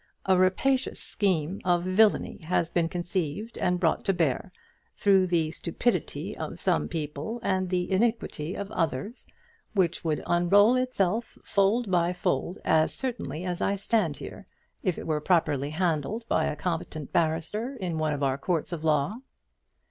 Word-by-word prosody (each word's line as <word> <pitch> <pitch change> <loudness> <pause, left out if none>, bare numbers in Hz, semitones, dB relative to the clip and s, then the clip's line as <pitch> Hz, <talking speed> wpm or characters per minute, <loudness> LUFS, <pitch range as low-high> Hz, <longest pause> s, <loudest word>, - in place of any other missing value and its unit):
A 190 - +4
rapacious 190 +9 +2
scheme 185 -3 -1
of 175 -1 +2
villainy 200 +4 +3
has 165 -1 0
been 170 -1 +1
conceived 175 +4 -3
and 180 0 +1
brought 165 -3 +1
to 195 - +3
bear, 165 -1 0 0.5
through 195 -2 +4
the 165 -3 +1
stupidity - - -2
of - - -6
some 75 -1 +1
people 155 - -4
and 185 -3 0
the 180 0 -1
iniquity 190 -6 0
of 200 +1 -5
others, 165 - -2 0.5
which 185 -5 +1
would 155 -2 -1
unroll 200 +7 +5
itself 230 -4 0
fold 200 +2 +2
by 175 0 +2
fold 175 0 -1
as 155 0 +3
certainly 240 - -4
as 180 -1 -3
I 200 - +1
stand 195 -6 0
here, - - -9 0.3
if 185 - 0
it - - -6
were 155 -2 0
properly 150 -5 +2
handled 175 +7 -1
by - - +2
a - - -1
competent 160 -2 -4
barrister 170 - 0
in 180 -8 -3
one 155 -1 +1
of 145 -1 -3
our 135 0 +1
courts 170 +2 -1
of 160 -2 -5
law." 155 +6 +1
180 Hz, 155 wpm, -27 LUFS, 160-200 Hz, 0.5 s, unroll